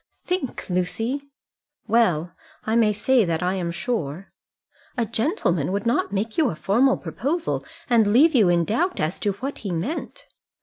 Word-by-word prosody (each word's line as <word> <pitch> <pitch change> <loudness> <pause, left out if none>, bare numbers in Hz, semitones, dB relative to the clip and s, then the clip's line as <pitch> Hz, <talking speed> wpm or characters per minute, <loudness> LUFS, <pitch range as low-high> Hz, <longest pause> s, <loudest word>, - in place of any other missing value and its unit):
"Think, 360 -8 -3
Lucy!" 225 +10 -2 0.6
"Well, 180 -8 +2 0.3
I 220 - 0
may 225 -2 +4
say 235 +4 +3
that 165 -2 -1
I 180 +1 +1
am 180 -3 -2
sure." 175 - -3 0.7
"A 235 - +1
gentleman 220 - 0
would 200 +2 -2
not 235 -4 +1
make 215 +7 -2
you 300 -6 +4
a 165 - -4
formal 235 - +2
proposal, 320 +7 -2 0.2
and 230 -4 +4
leave 300 +9 +5
you 215 -9 +5
in 170 -1 +3
doubt 340 - 0
as 155 +4 -1
to 205 - 0
what 265 +8 -5
he 205 - -5
meant." 180 - -4
220 Hz, 165 wpm, -23 LUFS, 180-260 Hz, 0.7 s, leave